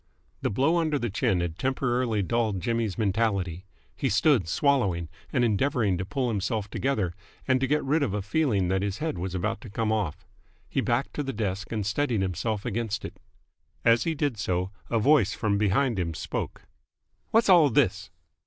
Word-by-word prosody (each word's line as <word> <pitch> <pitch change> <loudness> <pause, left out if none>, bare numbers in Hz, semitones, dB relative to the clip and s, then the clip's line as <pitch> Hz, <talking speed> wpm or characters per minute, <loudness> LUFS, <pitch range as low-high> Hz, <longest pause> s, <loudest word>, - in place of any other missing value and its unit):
The - - 0
blow 140 - +2
under 155 -3 +1
the 120 -5 -2
chin 105 -4 +1
had 85 -1 -4
temporarily 125 -5 0
dulled 110 -1 0
Jimmy's 115 0 -1
mentality. 100 -4 0 0.3
He 135 - -1
stood, 115 - +3
swallowing 95 - +1 0.2
and 120 - +2
endeavouring 110 -2 +1
to 95 - -2
pull 130 +2 -1
himself 105 0 -2
together 110 -11 -1 0.3
and 130 -1 +3
to 135 - +2
get 150 +2 +1
rid 150 +4 +1
of 115 -8 0
a 105 - -2
feeling 105 - +1
that 95 0 +1
his 100 0 -2
head 150 - -3
was 95 +1 -3
about 100 +4 -2
to 115 - -10
come 110 +2 -1
off. 105 -8 -2 0.4
He - - -1
backed 120 +4 0
to - - +1
the 135 -1 -3
desk 100 -3 -3
and 110 -3 -2
steadied 115 0 0
himself 100 +3 -2
against 110 -2 -2
it. - - -9 0.7
As 115 0 +5
he 165 -1 -1
did 145 -7 -1
so, 90 -1 -1 0.2
a 115 - +1
voice 125 -2 +4
from 100 -3 0
behind 105 +2 +2
him 85 -3 -2
spoke. - - -4 0.7
"Whassall 185 -9 +6
this?" 100 -7 +1
110 Hz, 180 wpm, -27 LUFS, 95-135 Hz, 0.7 s, Whassall